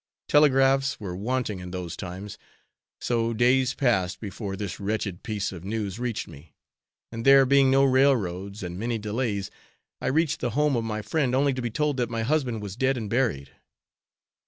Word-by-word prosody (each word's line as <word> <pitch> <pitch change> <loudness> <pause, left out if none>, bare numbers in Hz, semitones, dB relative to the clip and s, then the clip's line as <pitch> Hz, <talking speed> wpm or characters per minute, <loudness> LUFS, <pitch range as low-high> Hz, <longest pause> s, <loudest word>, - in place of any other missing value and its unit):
Telegraphs 135 -1 +4
were 95 -5 -5
wanting 110 0 -2
in 90 0 -7
those 90 -2 -5
times, 95 +2 -7 0.6
so 115 -1 0
days 125 +2 +3
passed 95 -9 +1
before 100 -1 -5
this 100 -1 -5
wretched 100 -2 -3
piece 105 -2 -3
of 90 -3 -9
news 105 0 -3
reached 120 -3 -3
me, 75 -1 -14 0.6
and 115 0 -5
there 135 0 +7
being 135 0 +4
no 135 +1 +4
railroads, 105 -8 +1
and 90 0 -5
many 115 +1 -1
delays, 105 -2 -2 0.5
I - - -2
reached 155 +2 +1
the 120 - -1
home 150 -2 +3
of 115 - 0
my 110 -1 -3
friend 135 -3 0
only 140 +1 +2
to 130 - -4
be 120 - -2
told 145 +4 -1
that 120 -2 0
my 115 -1 -2
husband 125 -5 0
was 100 -2 -6
dead 130 +2 +1
and 110 -4 -5
buried. 110 - 0
115 Hz, 180 wpm, -26 LUFS, 100-130 Hz, 0.6 s, there